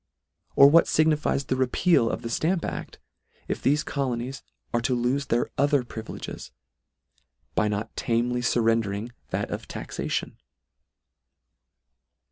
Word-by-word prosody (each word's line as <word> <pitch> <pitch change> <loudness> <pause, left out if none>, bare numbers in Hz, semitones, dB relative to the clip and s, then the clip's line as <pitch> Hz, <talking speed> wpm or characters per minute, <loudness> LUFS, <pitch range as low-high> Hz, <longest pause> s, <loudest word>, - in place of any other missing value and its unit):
Or 140 - +9
what 165 +4 +6
fignifies 155 -3 +2
the 130 - 0
repeal 130 0 +3
of - - -4
the 115 - -4
Stamp 170 +7 0
Act, - - -5 0.5
if - - -3
thefe 145 +2 +2
colonies 130 -1 -3 0.3
are 120 - +2
to 125 +1 +1
lofe 125 +3 0
their 120 +1 0
other 145 -1 +3
privileges, 110 -2 -7 1.0
by 105 - +2
not 105 +2 -3
tamely 120 +1 0
fur 120 0 +1
rendering 115 0 0 0.2
that - - -2
of - - -5
taxation? - - -4
125 Hz, 125 wpm, -26 LUFS, 115-140 Hz, 1.0 s, Or